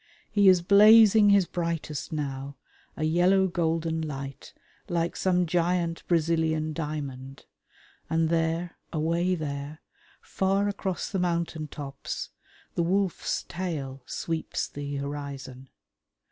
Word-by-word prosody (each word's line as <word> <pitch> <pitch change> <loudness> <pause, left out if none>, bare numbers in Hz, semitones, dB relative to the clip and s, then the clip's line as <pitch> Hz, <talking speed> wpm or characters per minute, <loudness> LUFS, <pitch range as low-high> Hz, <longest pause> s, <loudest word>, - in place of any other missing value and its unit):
He 205 -2 +6
is 180 -2 +5
blazing 210 +2 +7
his 200 -2 +5
brightest 165 -4 -3
now, 140 -2 -4 0.4
a 155 - -2
yellow 180 +4 +4
golden 165 -2 -1
light 140 -3 -6 0.4
like 170 -1 -1
some 180 -1 +2
giant 170 0 0
Brazilian 160 -2 +1
diamond, 140 -4 -6 0.6
and 160 0 +1
there, 165 +1 -1
away 170 +3 +1
there, 145 -1 -5 0.4
far 195 +1 0
across 195 -3 -3
the 195 - -1
mountain 170 -3 -1
tops, 140 -2 -6 0.4
the - - 0
Wolf's 185 +2 0
Tail 150 -7 -5
sweeps 165 -1 -3
the 145 0 -6
horizon. 140 -2 -6
165 Hz, 110 wpm, -27 LUFS, 145-180 Hz, 0.6 s, blazing